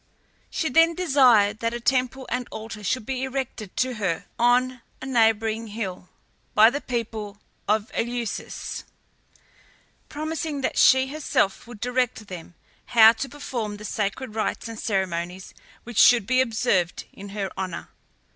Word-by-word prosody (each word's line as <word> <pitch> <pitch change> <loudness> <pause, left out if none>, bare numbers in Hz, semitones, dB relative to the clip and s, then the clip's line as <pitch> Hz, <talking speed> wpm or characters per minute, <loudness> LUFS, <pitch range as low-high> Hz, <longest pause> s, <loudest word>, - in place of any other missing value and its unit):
She 320 - -1
then 330 +5 +4
desired 250 - +4
that 230 0 -1
a - - -3
temple 255 +1 0
and 250 0 -2
altar 220 -1 -8
should 220 +3 -1
be 260 +1 -3
erected 260 -6 -4
to 255 0 +1
her 185 -6 -2
on 250 +1 +3 0.2
a - - -7
neighbouring 225 -2 +2
hill 195 -4 -6 0.5
by 220 +2 +7
the 285 +2 -3
people 220 -4 -4 0.3
of 215 +2 +1
Eleusis, 235 -2 -4 1.3
promising 310 -1 -3
that - - -1
she 260 0 +6
herself 275 -9 0
would 240 -3 -11
direct 245 -3 -1
them 175 -2 -9 0.3
how 225 -2 +8
to 250 +4 -5
perform 240 -8 -5
the 210 - -9
sacred 210 +3 -3
rites 220 +1 -2
and 225 -1 -7
ceremonies, 185 -2 -2 0.3
which 235 -3 -3
should 240 -5 +7
be 255 +3 +3
observed 220 -8 0
in 200 +1 -10
her 195 -1 -4
honour. 185 -3 -5
230 Hz, 145 wpm, -24 LUFS, 205-255 Hz, 1.3 s, how